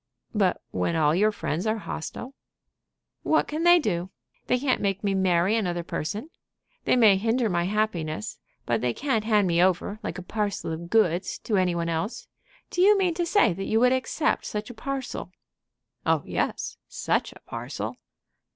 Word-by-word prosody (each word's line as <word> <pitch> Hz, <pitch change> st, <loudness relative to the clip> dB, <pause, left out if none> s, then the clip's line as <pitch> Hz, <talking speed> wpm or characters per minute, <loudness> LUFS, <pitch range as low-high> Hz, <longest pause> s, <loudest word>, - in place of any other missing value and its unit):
"But 200 Hz, -4 st, +2 dB
when 170 Hz, -, 0 dB
all 155 Hz, -2 st, +3 dB
your 210 Hz, +5 st, +3 dB
friends 190 Hz, -2 st, -3 dB
are 215 Hz, +1 st, +1 dB
hostile?" 230 Hz, +6 st, -6 dB, 0.9 s
"What 315 Hz, -, +2 dB
can 305 Hz, +2 st, -3 dB
they 345 Hz, +1 st, +7 dB
do? 185 Hz, -, -1 dB, 0.4 s
They 250 Hz, -, +3 dB
can't 260 Hz, +1 st, 0 dB
make 195 Hz, -1 st, -1 dB
me 200 Hz, -1 st, +1 dB
marry 190 Hz, +1 st, +2 dB
another 175 Hz, -6 st, -1 dB
person. 210 Hz, -, -4 dB, 0.5 s
They -, -, +4 dB
may 220 Hz, -6 st, +6 dB
hinder 230 Hz, +3 st, +1 dB
my 175 Hz, 0 st, +1 dB
happiness; 180 Hz, -, -2 dB, 0.3 s
but -, -, 0 dB
they 125 Hz, -1 st, 0 dB
can't 230 Hz, -7 st, 0 dB
hand 210 Hz, -3 st, +3 dB
me 170 Hz, 0 st, +3 dB
over, 190 Hz, +3 st, +1 dB
like -, -, -4 dB
a 185 Hz, -, -6 dB
parcel 205 Hz, -2 st, -2 dB
of 170 Hz, +1 st, -6 dB
goods, 185 Hz, -5 st, +2 dB
to 215 Hz, -, 0 dB
any 185 Hz, -2 st, +2 dB
one 170 Hz, 0 st, -1 dB
else. 200 Hz, -, -3 dB, 0.4 s
Do 355 Hz, -, 0 dB
you 410 Hz, +2 st, +6 dB
mean 370 Hz, -3 st, +2 dB
to 345 Hz, 0 st, -1 dB
say 410 Hz, -, +4 dB
that 195 Hz, +3 st, -5 dB
you 220 Hz, -, +2 dB
would 250 Hz, +2 st, +5 dB
accept 260 Hz, +4 st, 0 dB
such 210 Hz, +3 st, -4 dB
a -, -, -10 dB
parcel?" 260 Hz, -5 st, -5 dB, 0.7 s
"Oh -, -, +2 dB
yes -, -, -2 dB
such -, -, -1 dB
a -, -, -15 dB
parcel!" -, -, -5 dB
210 Hz, 180 wpm, -26 LUFS, 175-245 Hz, 0.9 s, they